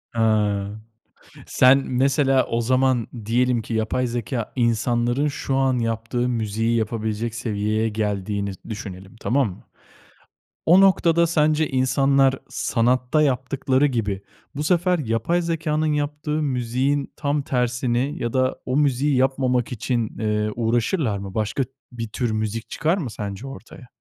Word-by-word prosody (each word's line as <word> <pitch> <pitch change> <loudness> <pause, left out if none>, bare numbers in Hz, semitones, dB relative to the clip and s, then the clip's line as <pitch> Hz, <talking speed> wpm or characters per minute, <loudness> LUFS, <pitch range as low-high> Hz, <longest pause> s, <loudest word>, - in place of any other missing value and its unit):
Hıı, 105 -2 +1 0.7
sen, 130 +1 +5
mesela, 135 0 +2
o 115 - -1
zaman 130 0 +2 0.2
diyelim 120 +1 +2
ki 115 - -6
yapay 115 +3 0
zekâ 120 -1 -3
insanların 120 +3 +1
şu 140 -1 -2
an 135 -2 +2
yaptığı 115 +2 -1
müziği 115 0 0
yapabilecek 110 0 -2
seviyeye 110 -1 -1
geldiğini 105 -1 -2 0.2
düşünelim, 95 -2 -8
tamam 135 0 +2
mı? 90 - -12 1.0
O 180 +4 +7
noktada 170 -3 +4
sence 155 -1 +2
insanlar 135 +1 +2
sanatta 125 +5 +1
yaptıkları 135 0 +1
gibi 110 -8 -1 0.3
bu 145 - -2
sefer 180 +2 +2
yapay 120 +7 0
zekânın 155 -2 0
yaptığı 150 +1 -2
müziğin 130 +1 -1
tam 145 0 -1
tersini 125 +1 0
ya 120 - -2
da 130 0 +1
o 130 +2 0
müziği 145 0 +2
yapmamak 130 -2 +1
için, 120 -1 -2
ııı, 105 -1 0
uğraşırlar 120 - 0
mı? 100 -1 -7
Başka 110 +6 -1 0.3
bir 115 -2 -5
tür 120 +1 -2
müzik 110 +1 -3
çıkar 165 +4 0
mı 150 -10 -3
sence 105 +4 -6
ortaya? 135 -2 -11
125 Hz, 130 wpm, -23 LUFS, 110-140 Hz, 1.0 s, O